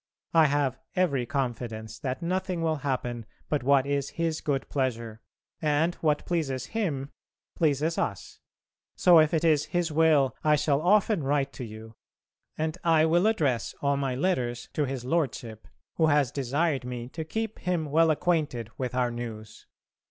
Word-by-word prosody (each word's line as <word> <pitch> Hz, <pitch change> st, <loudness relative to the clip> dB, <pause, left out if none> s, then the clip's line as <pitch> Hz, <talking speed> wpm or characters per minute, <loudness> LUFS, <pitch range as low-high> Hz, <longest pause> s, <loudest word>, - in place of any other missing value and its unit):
I 160 Hz, -2 st, +6 dB
have 140 Hz, -2 st, 0 dB, 0.2 s
every 140 Hz, -10 st, +1 dB
confidence 120 Hz, -5 st, -4 dB
that 130 Hz, +2 st, -4 dB
nothing 180 Hz, -1 st, -1 dB
will 160 Hz, -1 st, +1 dB
happen 125 Hz, -5 st, -3 dB, 0.2 s
but 150 Hz, -, 0 dB
what 135 Hz, +1 st, +3 dB
is 140 Hz, -1 st, -1 dB
His 165 Hz, -1 st, -2 dB
good 140 Hz, -4 st, -1 dB
pleasure, 115 Hz, -5 st, -2 dB, 0.4 s
and 155 Hz, +2 st, +2 dB
what 150 Hz, -2 st, +1 dB
pleases 135 Hz, -7 st, -2 dB
Him 150 Hz, -11 st, -2 dB, 0.4 s
pleases 155 Hz, +1 st, +1 dB
us. 100 Hz, -, -4 dB, 0.6 s
So 175 Hz, -2 st, +6 dB
if 155 Hz, -1 st, +4 dB
it 160 Hz, -1 st, 0 dB
is 155 Hz, -3 st, +3 dB
His 175 Hz, -2 st, -1 dB
will 150 Hz, -4 st, +3 dB
I 150 Hz, -1 st, +4 dB
shall 145 Hz, -1 st, +1 dB
often 200 Hz, +1 st, +3 dB
write 140 Hz, 0 st, 0 dB
to 130 Hz, -, -7 dB
you, 110 Hz, 0 st, -9 dB, 0.6 s
and 155 Hz, 0 st, -2 dB
I 160 Hz, -2 st, +4 dB
will 175 Hz, +5 st, +3 dB
address 140 Hz, -, 0 dB
all 140 Hz, 0 st, +1 dB
my 135 Hz, -2 st, -1 dB
letters 125 Hz, -6 st, -1 dB
to 150 Hz, -, 0 dB
his 130 Hz, -2 st, -5 dB
Lordship, 125 Hz, -7 st, -2 dB, 0.3 s
who 160 Hz, -, +4 dB
has 145 Hz, -4 st, +3 dB
desired 140 Hz, +2 st, 0 dB
me 125 Hz, -1 st, -5 dB
to 160 Hz, +4 st, -5 dB
keep 220 Hz, +6 st, -4 dB
him 180 Hz, -3 st, -1 dB
well 165 Hz, +2 st, +4 dB
acquainted 150 Hz, -8 st, 0 dB
with 125 Hz, -1 st, -3 dB
our 125 Hz, -1 st, +1 dB
news. 115 Hz, -2 st, -8 dB
145 Hz, 160 wpm, -27 LUFS, 125-160 Hz, 0.6 s, I